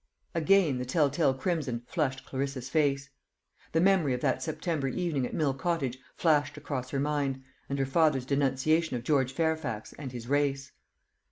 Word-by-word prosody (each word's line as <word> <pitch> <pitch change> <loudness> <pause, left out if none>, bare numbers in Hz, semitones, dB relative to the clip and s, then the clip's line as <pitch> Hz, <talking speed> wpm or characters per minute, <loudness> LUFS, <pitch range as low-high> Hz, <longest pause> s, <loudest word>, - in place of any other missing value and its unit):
Again 165 -4 +3
the - - -2
tell 145 +2 +2
tale 145 -2 +2
crimson 135 -6 -2
flushed 135 -4 -2
Clarissa's 135 -1 -3
face. 140 -3 +1 0.6
The 160 - +2
memory 175 -7 +3
of 125 - -5
that 135 -3 +1
September 160 -3 -2
evening 140 -2 -1
at - - -10
Mill 145 -4 +1
Cottage 140 -5 -2 0.2
flashed 145 -3 +2
across 135 -4 -4
her 135 - -2
mind, 140 -2 -1 0.3
and 140 - -1
her 135 - +1
father's 135 -2 +2
denunciation 140 +3 +1
of 120 - -7
George 130 -2 +2
Fairfax 160 -7 -2
and 135 -4 -5
his 120 -2 -7
race. 140 0 0
140 Hz, 165 wpm, -29 LUFS, 130-160 Hz, 0.6 s, Again